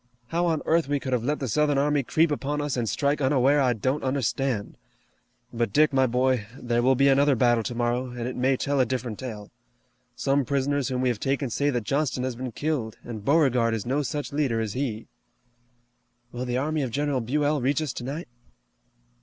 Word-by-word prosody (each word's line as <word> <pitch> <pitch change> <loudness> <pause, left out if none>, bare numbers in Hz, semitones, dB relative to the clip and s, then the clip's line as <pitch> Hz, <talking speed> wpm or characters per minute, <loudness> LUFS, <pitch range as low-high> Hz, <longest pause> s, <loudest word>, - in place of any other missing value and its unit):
How 175 +1 +1
on 160 -3 0
earth 165 -2 +2
we 145 0 0
could 130 -1 -3
have 120 -2 0
let 150 +4 0
the 135 - -3
Southern 145 +4 +2
army 145 +1 +2
creep 155 +5 +2
upon 145 0 -2
us 145 -2 -1
and 120 -3 -1
strike 145 +1 0
unaware 135 +1 +3
I 125 -2 +3
don't 130 +6 -1
understand. 130 -3 -1 0.8
But 115 -3 -1
Dick, 150 +3 +4
my 130 -1 +4
boy, 125 -2 +1
there 120 -1 0
will 130 +2 +4
be 135 +2 +4
another 140 +1 +4
battle 120 -1 +3
tomorrow, 120 +2 -1
and 120 0 -7
it 125 - -4
may 130 +1 +2
tell 140 +1 0
a 130 - +4
different 120 -3 -3
tale. 110 -5 -7 0.6
Some 140 +1 +1
prisoners 140 0 0
whom 130 -1 -1
we 130 - +2
have 120 -4 -2
taken 135 0 -1
say 145 +6 +1
that 120 -5 -1
Johnston 135 +1 -1
has 130 -2 -2
been 125 +1 -5
killed, 125 -4 -2
and 110 -4 -7
Beauregard 125 -5 +3
is 110 - -4
no 135 +4 0
such 145 +1 -4
leader 140 -6 0
as 110 -2 -2
he." 125 -5 -3 1.3
"Will 125 +1 -4
the 125 0 -1
army 155 +3 0
of 130 - -1
General 140 +1 -1
Buell 145 +4 0
reach 135 +3 +1
us 145 - -3
tonight?" 140 +7 -5
130 Hz, 205 wpm, -26 LUFS, 120-145 Hz, 1.3 s, Dick